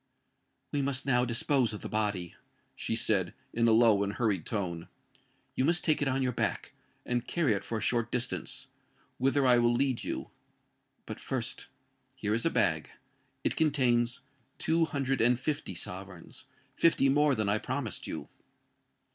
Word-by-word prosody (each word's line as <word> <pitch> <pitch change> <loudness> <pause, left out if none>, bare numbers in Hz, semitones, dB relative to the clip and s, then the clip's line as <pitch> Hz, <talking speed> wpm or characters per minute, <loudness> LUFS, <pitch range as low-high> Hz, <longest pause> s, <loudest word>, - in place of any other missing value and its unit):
"We 145 - 0
must 135 0 -1
now 125 -2 +3
dispose 120 0 +1
of 105 - -6
the - - -5
body," 100 -5 -1 0.4
she - - -2
said, 100 -5 +1 0.2
in 115 0 +2
a - - +5
low 110 -3 +5
and 100 0 -1
hurried 105 -9 0
tone. 90 -6 -3 0.7
"You - - 0
must 170 +5 +2
take 155 -2 +2
it 145 - +1
on 135 0 +1
your 125 - +1
back, - - -2 0.3
and 125 0 -1
carry 155 -10 +2
it 100 -1 -2
for 115 - -3
a - - -4
short 115 +2 0
distance, 125 -1 -2 0.5
whither 135 +2 +2
I 125 -1 +6
will 120 0 +4
lead 130 0 +1
you. - - -4 0.7
But, - - -7
first—here 105 - -5
is 115 +1 +1
a - - +3
bag: - - +1 0.5
it - - 0
contains 125 -5 +2 0.4
two 165 0 +2
hundred 135 -4 -1
and 120 +1 +4
fifty 145 - -3
sovereigns—fifty 95 - -2
more 145 +1 +4
than 110 -3 -1
I 100 +2 +2
promised 125 -4 -3
you." - - -5
120 Hz, 160 wpm, -30 LUFS, 110-135 Hz, 0.7 s, I